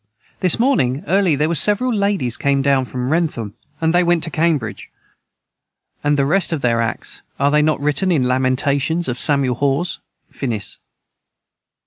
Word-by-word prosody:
This 180 -3 +3
morning 155 - +1
early 185 -1 +2
their 150 +2 0
was 165 -2 +2
several 220 +7 +2
Laidies 200 - 0
came 140 -1 0
down 135 -2 +2
from 125 +1 -4
wrentham 150 -11 -1 0.3
and 160 0 +1
they 175 +1 +3
went 175 -1 +1
to 165 - -3
cambridg 150 -9 -1 1.1
and 145 0 +1
the 140 - +2
rest 175 +5 +2
of 160 -4 -2
their 115 -1 +1
acts 115 - -3 0.2
are 140 +1 +2
they 150 0 +3
not 155 +1 +1
writen 150 +6 0
in 150 -7 +2
the - - 0
Lamentations 130 +6 0
of 125 -1 -3
Samuel 140 -3 +2
Haws, 140 +6 -1 0.3
finis. 115 -6 -3
145 Hz, 165 wpm, -18 LUFS, 130-170 Hz, 1.1 s, This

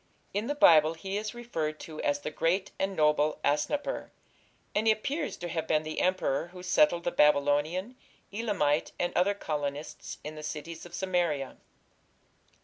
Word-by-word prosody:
In 210 +3 -1
the 290 - -1
Bible 160 - +6
he 190 +4 -5
is 215 +3 -3
referred 160 -11 -3
to 155 -1 -7
as 145 0 0
"the 155 - -4
great 185 +5 0
and 195 0 -1
noble 150 -1 +2
Asnapper", 150 - 0 0.6
and 215 +2 +1
he - - +8
appears 285 +8 -3
to 175 - -5
have 160 -1 -3
been 155 0 +2
the 155 0 -3
emperor 180 -5 +1
who 180 +1 -11
settled 170 -1 +3
the 175 - 0
Babylonian, 150 - +2 0.4
Elamite, 200 -10 0
and 175 0 0
other 200 +3 +3
colonists 145 -4 -4
"in 150 - -6
the 155 - -8
cities 155 +2 -6
of 175 - -9
Samaria". 175 -8 -1
165 Hz, 160 wpm, -29 LUFS, 150-195 Hz, 0.6 s, he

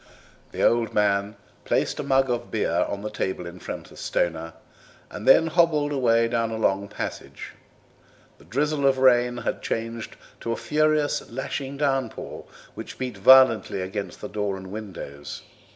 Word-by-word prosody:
The - - -2
old 115 -2 +2
man 100 0 +1 0.3
placed - - 0
a - - -1
mug 135 -1 +3
of 120 -1 -2
beer 85 -6 +1
on 100 0 -4
the 105 - -4
table 95 -3 -3
in 85 +1 -9
front - - -7
of - - -13
Stoner 80 -1 -1 0.6
and 105 - -7
then 150 +5 +7
hobbled 160 -3 +2
away 115 -4 +3
down 115 -1 0
a 110 - -4
long 100 -2 +1
passage. - - -6 0.9
The 70 - -18
drizzle 140 - 0
of 135 -1 +3
rain 125 -2 +4
had 120 - -3
changed 115 0 -4 0.2
to 115 - -3
a - - 0
furious 155 -1 +1
lashing 135 +2 -4
downpour, 135 -5 -2 0.3
which - - -8
beat 125 -4 -4
violently 130 -2 +6
against 95 +2 -5
door 105 -2 -2
and 95 0 -10
windows. 95 -9 -7
115 Hz, 155 wpm, -25 LUFS, 100-135 Hz, 0.9 s, then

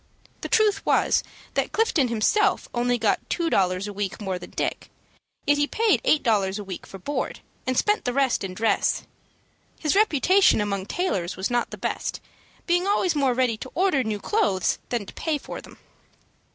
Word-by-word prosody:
The - - -5
truth 420 -3 +3
was - - +2 0.3
that - - 0
Clifton 365 - +2
himself 240 - +2
only 245 0 +1
got - - +2
two 335 -2 0
dollars 185 +1 +1
a 205 - -6
week 200 0 -3
more 190 -3 -3
than 175 - -10
Dick, - - -3 0.6
yet 290 0 +3
he 290 - +2
paid 445 +4 +2
eight 310 -12 +3
dollars 200 -5 +1
a 210 - -5
week 190 -2 -8
for 195 - -9
board, 285 +10 -4 0.3
and 255 -1 0
spent 420 0 +2
the 245 - +1
rest 265 -3 +1
in 185 -1 -5
dress. 225 +3 +1 0.8
His 305 +2 0
reputation 385 - +4
among 200 -2 -2
tailors 195 - -2
was 190 +5 -2
not 240 0 +1
the - - -8
best, - - -3 0.5
being 355 +2 +1
always 380 -3 +2
more 275 -5 +1
ready 250 -3 +1
to 260 - -8
order 360 -7 +2
new 215 -2 -2
clothes 350 - +1
than 235 -4 -2
to - - -11
pay 315 -2 -1
for - - -8
them. - - -15
250 Hz, 185 wpm, -25 LUFS, -, 0.8 s, reputation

